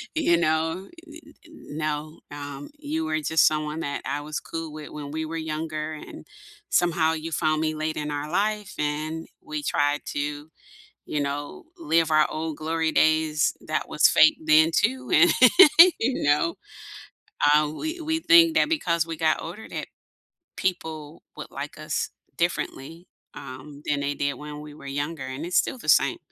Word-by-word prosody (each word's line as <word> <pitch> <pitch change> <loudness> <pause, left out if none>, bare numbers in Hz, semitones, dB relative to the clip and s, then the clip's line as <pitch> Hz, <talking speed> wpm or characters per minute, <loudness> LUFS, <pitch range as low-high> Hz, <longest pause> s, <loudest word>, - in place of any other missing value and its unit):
you 175 - +3
know, 160 +3 0 0.2
u 315 0 -12
n - - -16
n 310 - -11
no, 155 0 -4
um, 145 -1 -7
you 315 +2 -3
were 155 - -1
just 155 +1 +3
someone 155 +1 0
that 145 -2 -3
I 145 +2 -2
was 150 0 -4
cool 165 -2 -6
with 155 -1 -8
when 145 -1 -7
we 160 +1 -3
were 165 +1 -5
younger 155 0 -4
and 150 - -10 0.4
somehow 165 -2 +2
you 165 +1 -5
found 155 -1 0
me 155 0 -1
late 155 0 -3
in 150 0 -3
our 145 +1 -4
life 210 +1 -1
and 155 +2 -3
we 155 -1 -5
tried 145 0 0
to, 145 +1 -4 0.6
you 150 - -2
know, 145 - -4
live 165 - +1
our 155 0 +5
old 155 -1 -4
glory 160 0 -1
days 155 -1 +2
that - - -2
was - - +4
fake 155 - +5
then 155 +1 +5
too, 255 +8 0
and, 170 +3 +6 0.7
you 250 +3 -1
know, 150 +3 +2 1.0
uh, 150 0 +4
we 315 - -5
we 320 +1 -1
think 330 0 +6
that - - +3
because 170 - +1
we 165 -1 -6
got 155 0 +1
older 180 +7 -8
that - - -5 0.7
people 160 -4 -4 0.2
would - - -8
like 140 +2 -7
us 155 0 -2 0.3
differently, 170 -1 -3 0.3
um, 140 +3 -10
than 145 -1 0
they 145 0 -2
did 140 0 -1
when 150 0 -8
we 150 -1 -10
were 140 -2 -12
younger, 145 +1 -4
and 130 +5 -5
it's 175 - 0
still - - +1
the - - -6
same. - - +4
155 Hz, 175 wpm, -25 LUFS, 150-170 Hz, 1.0 s, and